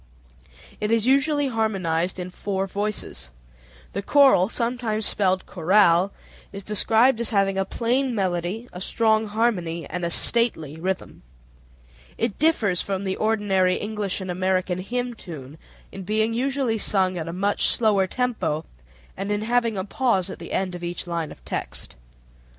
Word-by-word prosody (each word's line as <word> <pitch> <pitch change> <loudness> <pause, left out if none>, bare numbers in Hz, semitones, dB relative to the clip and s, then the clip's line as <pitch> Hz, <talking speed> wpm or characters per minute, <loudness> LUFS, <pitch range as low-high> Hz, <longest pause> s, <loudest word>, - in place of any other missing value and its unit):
It 210 - -1
is 225 -1 +2
usually 280 +2 +3
harmonized 185 -7 0
in 180 0 -5
four 195 +1 -2
voices. 200 - -4 0.6
The 200 - -2
choral 265 -6 +5
(sometimes 230 -3 -1
spelled 190 -2 +1
chorale) 185 +1 +3 0.4
is 200 0 -7
described 225 +4 +3
as 235 - -1
having 195 -2 +2
"a 195 0 0
plain 245 +4 0
melody, 185 +3 -2
a 180 - -7
strong 220 +1 +2
harmony, 200 -7 -1
and 180 - -4
a 170 - 0
stately 170 - +1
rhythm." 185 +3 -4 1.0
It 230 -3 -2
differs 225 - +2
from 195 -1 -3
the 190 -1 -1
ordinary 200 -4 +2
English 210 -2 -3
and 185 -1 -4
American 185 0 0
hymn 245 +5 -3
tune 155 - -10 0.3
in 195 - -8
being 215 +4 0
usually 260 -2 0
sung 190 -3 +2
at 160 - -4
a - - -3
much 200 +4 +1
slower 205 -4 +3
tempo, 185 -11 -1 0.5
and 195 +2 -4
in 205 0 0
having 230 -2 +1
a 190 - -1
pause 200 -5 0
at - - -9
the - - -9
end 185 -1 -1
of 175 0 -7
each 175 0 -4
line 170 -3 -3
of - - -14
text. - - -5
200 Hz, 155 wpm, -24 LUFS, 185-230 Hz, 1.0 s, choral